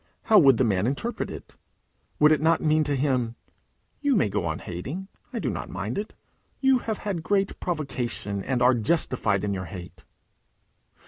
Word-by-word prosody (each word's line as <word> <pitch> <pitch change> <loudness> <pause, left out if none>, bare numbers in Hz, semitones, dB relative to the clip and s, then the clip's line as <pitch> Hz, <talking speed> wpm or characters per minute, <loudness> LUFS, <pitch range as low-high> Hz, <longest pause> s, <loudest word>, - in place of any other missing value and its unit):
How 215 -2 +6
would 135 -7 +6
the 130 - +3
man 105 -2 +1
interpret 210 - -2
it? - - -10 0.6
Would 150 +1 +6
it 155 - +3
not 165 +1 +3
mean 155 0 +3
to 145 0 0
him, 130 -4 0 0.6
"You 285 -2 +2
may 110 - +3
go 95 -3 -1
on 80 -1 -1
hating. 140 - -6 0.2
I 245 - -4
do 155 - -1
not - - -5
mind 110 - -3
it. 210 - -6 0.4
You 265 -2 +4
have 220 -2 -3
had 195 -5 -3
great 195 +3 0
provocation, 125 - -3
and 125 -2 0
are 125 +1 +6
justified 115 - +1
in 100 -1 0
your 95 -1 -4
hate"? 90 +1 -10
135 Hz, 180 wpm, -26 LUFS, -, 0.6 s, How